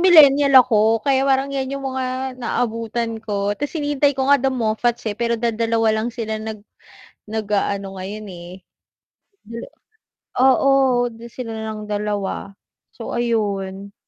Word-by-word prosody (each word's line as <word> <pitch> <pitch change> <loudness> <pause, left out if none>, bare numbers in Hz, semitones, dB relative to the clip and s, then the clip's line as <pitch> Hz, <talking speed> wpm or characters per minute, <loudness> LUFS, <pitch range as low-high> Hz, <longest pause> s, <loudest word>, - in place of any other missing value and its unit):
millennial 285 -6 +7
ako 225 -2 +4
kaya 270 -2 +3
parang 270 0 +2
'yan 265 -1 -2
yung 275 - -5
mga 260 0 -3
naabutan 230 -1 -2
ko 205 -1 -1
'tas 290 +4 -4
hinihintay 290 -2 +1
ko 265 0 0
nga 280 -2 +5
The 270 - +2
Moffats, 240 0 -1
eh, 210 - -1
pero 235 +1 0
dadalawa 230 -1 +1
lang 235 - -1
sila 220 -3 -3
nag 220 -1 -6 0.7
nag-aano 200 -2 -2
ngayon, 205 +3 -6
eh. 175 -1 -9 1.0
Dala 230 +2 -7 0.7
oo, 265 +1 +5 0.6
sila 235 -1 -7
na 220 - -5
lang 215 - -7
dalawa. 205 -1 -3 0.4
So, - - -7
ayun. 200 -4 -2
230 Hz, 135 wpm, -21 LUFS, 210-265 Hz, 1.0 s, millennial